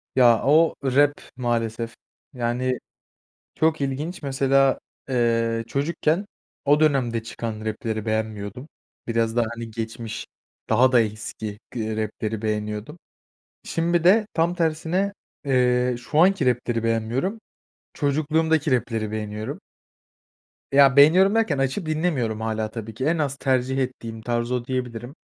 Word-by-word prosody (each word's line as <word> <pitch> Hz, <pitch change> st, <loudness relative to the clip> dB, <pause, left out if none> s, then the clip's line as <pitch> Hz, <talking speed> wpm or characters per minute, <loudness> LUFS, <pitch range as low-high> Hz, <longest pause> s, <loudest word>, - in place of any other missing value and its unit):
Ya 120 Hz, -4 st, +5 dB
o, 155 Hz, +5 st, +4 dB
rap 145 Hz, +2 st, +3 dB, 0.2 s
maalesef. 115 Hz, -2 st, -2 dB, 0.4 s
Yani, 125 Hz, +1 st, -1 dB, 0.8 s
çok 160 Hz, -2 st, +1 dB
ilginç 145 Hz, +7 st, -3 dB
mesela, 135 Hz, 0 st, +2 dB, 0.3 s
eee, 115 Hz, -2 st, +1 dB
çocukken 155 Hz, -, 0 dB, 0.4 s
o 145 Hz, +1 st, +4 dB
dönemde 130 Hz, -7 st, +2 dB
çıkan 110 Hz, -1 st, -5 dB
rap'leri 110 Hz, 0 st, -3 dB
beğenmiyordum. 110 Hz, +3 st, -3 dB, 0.4 s
Biraz 115 Hz, -1 st, 0 dB
daha, 120 Hz, -1 st, +3 dB
hani, 115 Hz, -1 st, -7 dB
geçmiş, 110 Hz, 0 st, -5 dB, 0.4 s
daha 130 Hz, +1 st, +4 dB
da 120 Hz, -, +6 dB
eski 110 Hz, -1 st, -5 dB
gı 110 Hz, -2 st, -3 dB
rap'leri 110 Hz, 0 st, -3 dB
beğeniyordum. 105 Hz, +6 st, -3 dB, 0.7 s
Şimdi 170 Hz, 0 st, 0 dB
de 210 Hz, +4 st, +5 dB
tam 170 Hz, +2 st, +2 dB
tersine, 170 Hz, +4 st, 0 dB, 0.3 s
eee, 125 Hz, -2 st, +2 dB
şu 125 Hz, +5 st, -3 dB
anki 185 Hz, -3 st, +4 dB
rap'leri 120 Hz, -2 st, 0 dB
beğenmiyorum, 120 Hz, -, -1 dB, 0.5 s
çocukluğumdaki 155 Hz, +1 st, +1 dB
rap'leri 115 Hz, -3 st, 0 dB
beğeniyorum. 105 Hz, 0 st, -5 dB, 1.1 s
Ya, 140 Hz, -1 st, +6 dB
beğeniyorum 180 Hz, +8 st, +6 dB
derken 220 Hz, -10 st, +2 dB
açıp 135 Hz, +7 st, -1 dB
dinlemiyorum 150 Hz, -9 st, -1 dB
hâlâ 110 Hz, -1 st, -2 dB
tabii 110 Hz, -1 st, -7 dB
ki. 130 Hz, +5 st, -3 dB
En 165 Hz, +2 st, +2 dB
az 145 Hz, -3 st, -1 dB
tercih 130 Hz, 0 st, 0 dB
ettiğim 115 Hz, -4 st, -4 dB
tarz 120 Hz, +1 st, -1 dB
o 125 Hz, -1 st, -1 dB
diyebilirim. 125 Hz, 0 st, -4 dB
125 Hz, 125 wpm, -24 LUFS, 115-150 Hz, 1.1 s, da